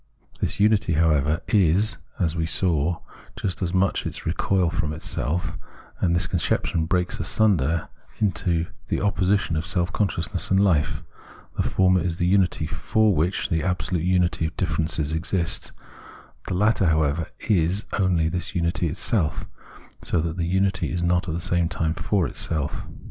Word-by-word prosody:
This - - 0
vmity, 105 -4 +3
however, 80 0 +2
is, 100 +2 +3 0.2
as 85 -4 0
we 80 -1 -1
saw, 85 -1 0 0.3
just 100 -5 -3
as 90 -2 0
much 95 +1 +1
its - - -7
recoil 90 +1 +1
from 75 -2 -1
itself; 80 +2 -3 0.4
and 85 -2 +2
this 90 +1 +1
conception 85 -2 0
breaks 90 +1 0
asunder 85 -3 +2 0.3
into 85 -4 0 0.2
the - - -1
opposition 100 -3 +1
of 80 - -1
self 90 -2 -1
consciousness 90 -6 -1
and 95 - +3
fife: 80 -5 +2 0.5
the - - 0
former 95 -1 +3
is 85 0 -2
the 85 - 0
unity 90 -4 +2
for 110 +6 +1
which 85 +4 0
the 80 -2 +1
absolute 90 0 -1
unity 90 -2 +1
of 85 - -10
differences 80 -4 -1
exists, 80 +2 -1 0.8
the - - -2
latter, 105 -1 +3
however, 80 0 +1 0.2
is 95 +1 +2
only 90 -5 +2
this 90 +4 -3
unity 85 0 0
itself, 85 0 0 0.6
so 85 - 0
that 80 0 -2
the 85 -2 -2
unity 95 +1 +1
is 90 -1 -1
not 90 +1 +1
at 80 - -2
the - - -2
same 85 0 +1
time 80 -2 -1
for 90 +2 0
itself. 75 +1 -2
85 Hz, 155 wpm, -24 LUFS, 80-95 Hz, 0.8 s, vmity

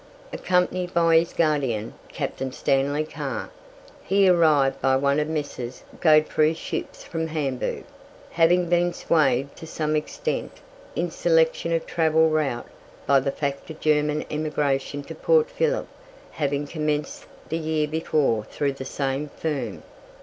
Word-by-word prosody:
Accompanied 180 0 0
by 165 -1 +5
his 170 +1 -3
guardian, 135 -9 0
Captain 135 -1 -4
Stanley 140 +3 +1
Carr, 155 - -5 0.5
he 195 0 +3
arrived 155 -6 +4
by 135 0 +3
one 140 +2 +2
of 150 - 0
the 160 - -4
Messrs. 130 -5 -5 0.2
Godeffroy's 155 0 +4
ships - - -5
from 165 -1 -3
Hamburg, 145 -5 -2 0.5
having 175 +1 +3
been 175 0 +2
swayed 140 -4 +1
to 160 - -10
some 155 -1 -1
extent 470 - -3 0.4
in - - -1
selection - - +2
of 165 -1 0
travel 160 -1 +3
route 150 -6 0 0.4
by 140 -1 +5
the 135 +1 -1
fact 140 +1 -4
of 160 - -8
German 150 0 +1
emigration 145 -2 -1
to 160 - -8
Port 475 - +2
Phillip - - 0 0.4
having 145 -1 -1
commenced 150 -1 -3 0.2
the 165 - -1
year 155 -1 0
before 150 -7 +1
through 140 -1 -2
the 135 -1 -8
same 135 +2 -2
firm. 135 -10 -3
155 Hz, 140 wpm, -24 LUFS, 140-165 Hz, 0.5 s, by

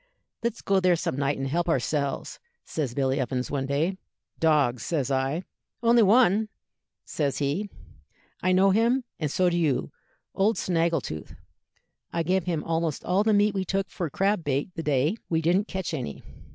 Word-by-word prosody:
'Let's 235 0 -3
go 195 -1 +3
there 180 -1 +4
some 160 - -2
night 140 +1 0
and 135 0 -2
help 170 +5 0
ourselves,' 140 0 -1 0.3
says 140 -6 -3
Billy 135 0 +1
Evans, 130 -1 -2
one 135 -2 -1
day. 160 +7 0 0.4
'Dogs,' 145 -7 +3
says 140 -5 -1
I. 135 +6 0 0.4
'Only 235 0 +5
one,' 215 0 +4 0.6
says 145 -3 -1
he; 150 +9 -1 0.7
'I 185 - +2
know 190 +1 +5
him, 235 +6 +2 0.2
and 155 -4 -1
so 180 +5 +2
do 175 0 +1
you 135 - 0 0.4
old 210 +3 +2
Snaggletooth; 165 - -1 0.8
I 170 - -1
gave 180 +1 +1
him 165 -4 -1
almost 165 -2 -2
all 185 +3 +2
the 220 - +2
meat 205 0 +3
we 190 -1 -1
took 195 +1 -2
for 170 -4 -3
crab 195 +4 +1
bait 145 +5 -1
the 165 - -4
day 150 - +1
we 160 - +2
didn't 180 +6 +2
catch 190 -4 -4
any.' 125 - -5
165 Hz, 170 wpm, -26 LUFS, 140-195 Hz, 0.8 s, Only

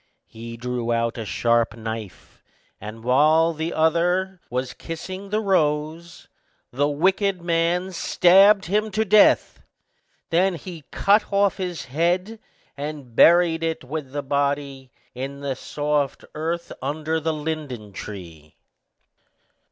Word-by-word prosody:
He 115 +1 -9
drew 120 0 -3
out 115 0 -1
a 110 - -4
sharp 115 +1 +1
knife, 110 -4 -8 0.4
and 110 +2 -9
while 155 +6 +4
the 160 +2 -3
other 175 +3 +1
was 125 0 -3
kissing 185 +4 -7
the 210 +2 0
rose, 165 -3 -1 0.4
the 145 +4 +1
wicked 185 +5 +1
man 170 +2 0
stabbed 195 +3 +5
him 210 +4 0
to 220 +1 +1
death; 210 +1 +4 0.7
then 180 +2 +2
he 165 -2 -9
cut 205 +2 +2
off 200 0 +2
his 180 -3 -4
head, 175 - -1 0.4
and 145 -4 -7
buried 170 +1 +5
it 165 -3 -2
with 140 0 -6
the 145 0 -4
body 140 -1 -2 0.2
in 135 +2 -6
the 140 -2 -2
soft 145 +1 -2
earth 165 +2 -3
under 155 +4 -2
the 160 +1 -1
linden 145 -9 -5
tree. 85 -7 -10
155 Hz, 125 wpm, -23 LUFS, 130-175 Hz, 0.7 s, stabbed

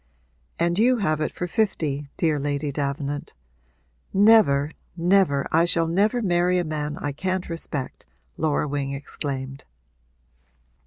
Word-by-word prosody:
'And 170 +2 +1
you 250 +3 +4
have 155 -8 0
it - - -1
for 180 - -4
fifty, 160 -8 -1
dear 155 -3 +1
Lady 145 +1 -2
Davenant. 140 +1 -3 0.8
Never, 195 -9 +5 0.3
never 170 -5 +3
I 165 +2 +4
shall 170 -1 +2
never 210 +8 +1
marry 180 -1 +2
a 175 - +1
man 150 -2 -3
I 145 - -3
can't 185 +5 -2
respect!' 150 -5 -5 0.3
Laura 150 -1 0
Wing 140 -1 -2
exclaimed. 135 -1 -5
155 Hz, 125 wpm, -24 LUFS, 145-180 Hz, 0.8 s, Never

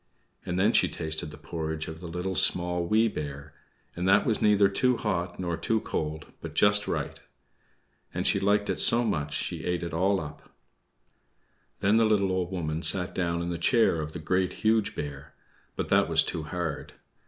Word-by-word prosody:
And 90 - -2
then 105 +5 +3
she - - +4
tasted 80 -2 -4
the - - -11
porridge 80 -1 -4
of 80 0 -7
the 85 - -8
Little, 90 +3 -3
Small, 90 -1 +1
Wee 110 +3 +3
Bear, 70 -6 -6 0.4
and 90 +2 -2
that 95 +2 +5
was 110 - +1
neither 105 -1 +5
too 125 +5 +1
hot 90 -5 -2
nor 85 -2 -2
too 110 +7 0
cold, 80 -5 -4 0.2
but - - -8
just 105 0 +3
right. - - -3 0.9
And - - -3
she - - +3
liked 100 +1 +2
it - - -3
so 120 +1 +5
much 75 -10 -1
that - - -1
she - - -5
ate 90 -1 -1
it 85 -2 -5
all 95 +4 +2
up! 75 -2 -10 1.3
Then 105 +3 +3
the 115 - +4
little 100 -3 +2
Old 90 -1 -1
Woman 80 -3 -3
sat 90 0 +2
down 85 -2 -1
in 85 - -3
the 85 - -4
chair 110 -5 +3
of 75 0 -6
the - - -5
Great, 90 +3 0
Huge 110 -1 +2
Bear, 70 0 -7 0.4
but - - -3
that - - +3
was - - +5
too 80 - -4
hard. 80 -3 -4
90 Hz, 195 wpm, -27 LUFS, 80-100 Hz, 1.3 s, that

